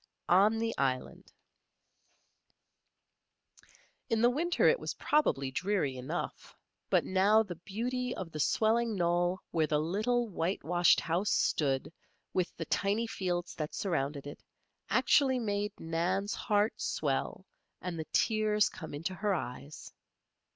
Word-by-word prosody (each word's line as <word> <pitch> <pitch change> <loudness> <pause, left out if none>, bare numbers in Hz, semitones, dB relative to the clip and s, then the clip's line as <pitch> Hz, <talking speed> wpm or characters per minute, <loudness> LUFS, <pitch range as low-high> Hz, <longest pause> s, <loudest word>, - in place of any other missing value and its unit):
ON 200 +5 +5
THE 225 0 -1
ISLAND 130 -2 -2 2.8
In 225 -2 +1
the 240 - +6
winter 340 +6 +2
it - - +4
was - - -4
probably 140 - +1
dreary 180 -4 0
enough; 130 +7 -5 0.3
but - - +3
now 200 +4 +4
the 180 -6 -8
beauty 250 +4 -2
of 175 -3 -6
the 155 - -6
swelling 225 +7 +2
knoll 175 0 +1
where 160 -2 +1
the 150 - +1
little 215 +10 0
whitewashed 175 -2 +2
house 175 +6 0
stood, 140 -4 +1 0.4
with 180 -2 0
the 165 - -4
tiny 200 +7 0
fields 180 -5 -3
that 155 -1 -5
surrounded 145 -6 -2
it, 145 - -9 0.5
actually 265 -3 +3
made 205 -3 -1
Nan's 180 +5 -1
heart 210 +1 +1
swell - - -2 0.3
and 175 -3 -5
the 160 - -3
tears 215 -2 +2
come - - -8
into 165 +6 -3
her 195 +2 0
eyes. 135 +1 -7
185 Hz, 130 wpm, -31 LUFS, 165-220 Hz, 2.8 s, the